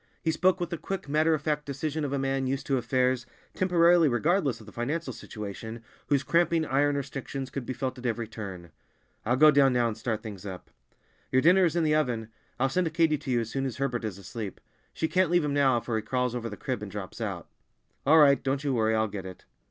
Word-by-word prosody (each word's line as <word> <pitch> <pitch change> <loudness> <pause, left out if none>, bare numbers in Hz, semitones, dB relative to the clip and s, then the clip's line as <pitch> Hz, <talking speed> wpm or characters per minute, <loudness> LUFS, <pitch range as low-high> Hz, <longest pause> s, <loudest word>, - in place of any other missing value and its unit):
He 160 - +2
spoke 185 +4 +2
with 175 -1 -3
the 170 - -3
quick, 195 -5 -5
matter 155 +2 +3
of 155 - -6
fact 150 -1 0
decision 150 +2 -3
of 140 - -2
a 140 - 0
man 135 0 -1
used 135 +1 -2
to 135 -2 +1
affairs, 125 0 0 0.3
temporarily 175 -3 +4
regardless 140 - +1
of 110 - -13
the 110 - -12
financial 135 +5 -3
situation, 110 +2 -7 0.2
whose 140 -2 +2
cramping 170 +1 +2
iron 145 +1 +2
restrictions 135 -1 -5
could 135 -3 -5
be 130 - -2
felt 130 0 -4
at 125 - -10
every 115 -1 -2
turn. 95 -6 -8 0.6
"I'll 120 - +3
go 155 +3 +7
down 140 -2 +4
now 120 -1 +2
and 110 - -3
start 110 -1 -3
things 105 -4 -8
up!" 95 -3 -8 0.6
"Your 130 - +3
dinner 180 +3 +6
is 170 - 0
in 170 - +2
the 155 -1 +2
oven. 120 -7 0 0.3
I'll 135 - +3
send 165 +4 0
Katy 160 -3 +3
to 140 - -8
you 120 -2 +2
as 115 - -5
soon 135 0 -1
as 130 - -6
Herbert 130 -3 -1
is 105 -4 -4
asleep. 100 +1 -7 0.3
She 160 - -1
can't 185 0 +2
leave 175 -2 +3
him 145 - -1
now, 135 -4 +3
for 115 0 -3
he - - -1
crawls 125 +2 -1
over 120 -2 -3
the 105 - -8
crib 130 -5 -3
and 105 -2 -6
drops 100 -2 -7
out." - - -4 0.6
"All 155 +4 +5
right! 140 -3 +6
Don't 135 +1 -1
you 140 -2 0
worry, 110 -2 +2
I'll 110 0 +2
get 100 -2 -6
it." 95 - -11
135 Hz, 235 wpm, -28 LUFS, 115-155 Hz, 0.6 s, go